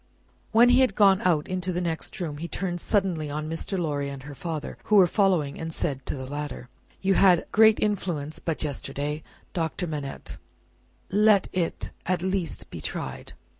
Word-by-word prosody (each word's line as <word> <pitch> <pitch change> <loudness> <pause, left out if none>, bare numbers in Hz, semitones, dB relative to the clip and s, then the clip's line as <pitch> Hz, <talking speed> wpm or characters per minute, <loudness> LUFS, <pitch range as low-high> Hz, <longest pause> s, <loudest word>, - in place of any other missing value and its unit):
When 235 +2 +6
he 250 +1 +6
had 255 -7 +3
gone 195 -2 +5
out 160 -5 +2
into 185 0 -2
the 175 - -1
next 170 0 -3
room, 155 -5 -3
he 170 - -4
turned 175 -1 -3
suddenly 185 -7 0
on 150 +1 -3
Mr. 165 +4 -3
Lorry 145 -5 -1
and 135 -2 -8
her 145 +1 -8
father, 155 +2 -5
who 215 - +3
were 195 -3 +8
following, 175 -7 +1
and 165 0 -4
said 135 -4 -2
to - - -2
the 130 -1 -6
latter: 145 -2 -6 0.3
"You 195 0 +3
had 185 -3 +5
great 220 0 +6
influence 175 -8 -1
but 165 -2 -3
yesterday, 145 +1 -3 0.3
Doctor 170 +1 -1
Manette; 145 -4 -5 0.7
let 210 0 +4
it 175 -3 -2 0.2
at 180 -1 0
least 190 -2 -2
be - - -7
tried. 65 -1 -5
170 Hz, 175 wpm, -26 LUFS, 150-190 Hz, 0.7 s, were